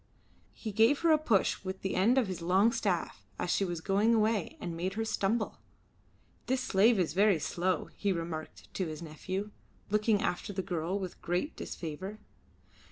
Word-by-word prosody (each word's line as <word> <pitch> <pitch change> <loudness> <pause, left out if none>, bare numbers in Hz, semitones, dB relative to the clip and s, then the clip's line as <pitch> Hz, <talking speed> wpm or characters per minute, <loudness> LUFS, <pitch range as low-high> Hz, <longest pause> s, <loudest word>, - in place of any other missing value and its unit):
He 220 - -5
gave 225 +7 +4
her 335 -1 +4
a 310 - +5
push 225 -12 +1
with 190 0 -5
the 190 - -1
end 225 +8 +3
of 260 - +4
his 185 -3 -5
long 190 +6 +4
staff - - -1
as - - -1
she - - +2
was 175 -3 -3
going 205 +6 +3
away 215 -3 +1
and 175 -2 -4
made 185 +3 -2
her 225 0 -1
stumble. 220 +1 -1 0.9
"This 260 0 +1
slave 220 0 +4
is 175 -5 +1
very 200 0 +4
slow," 180 +4 -1
he 200 - 0
remarked 165 -3 -5
to 185 - -1
his 155 +1 -6
nephew, 185 +6 -4 0.4
looking 210 0 +3
after 180 +3 -2
the 190 0 -2
girl 175 +2 -2
with 185 -3 -6
great 180 - -1
disfavour. 180 +6 -6
195 Hz, 175 wpm, -31 LUFS, 175-220 Hz, 0.9 s, a